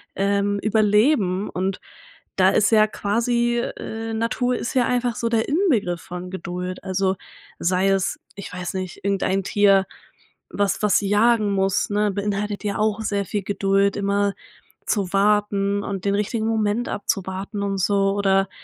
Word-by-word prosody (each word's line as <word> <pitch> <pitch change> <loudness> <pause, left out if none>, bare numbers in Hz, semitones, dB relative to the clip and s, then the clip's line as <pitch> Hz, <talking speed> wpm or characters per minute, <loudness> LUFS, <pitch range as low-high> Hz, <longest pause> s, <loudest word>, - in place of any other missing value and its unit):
ähm, 200 +1 +1
überleben." 210 -2 +2
Und 190 +1 -2 0.6
da 190 0 +5
ist 210 +2 +3
ja 215 -1 +6
quasi, 235 +3 0
äh 225 -1 -5
Natur 235 +3 0
ist 240 - -4
ja 250 -2 +4
einfach 245 -1 0
so 230 - -2
der 225 -1 +1
Inbegriff 255 - +1
von 180 0 -7
Geduld. 180 0 -5
Also 190 0 0 0.4
sei 185 +2 +1
es, 195 -1 0 0.2
ich 200 -2 -8
weiß 180 0 -4
nicht, 185 -1 -5
irgendein 195 -1 0
Tier, 195 0 +4 0.7
was 200 -1 0
was 210 - +4
jagen 210 +1 +3
muss, 195 -1 +1
ne? 210 0 +1
Beinhaltet 205 +1 -3
ja 205 - -1
auch 215 0 +1
sehr 205 -2 -1
viel 205 +3 -2
Geduld, 195 0 +1
immer 200 0 +1 0.5
zu 200 -4 -1
warten 205 0 +2
und 195 -2 -4
den 200 - +2
richtigen 215 +2 -1
Moment 220 +1 0
abzuwarten 195 +1 -3
und 195 -1 -2
so, 195 +1 +2
oder, 195 -1 +2
200 Hz, 150 wpm, -22 LUFS, 195-215 Hz, 0.7 s, ja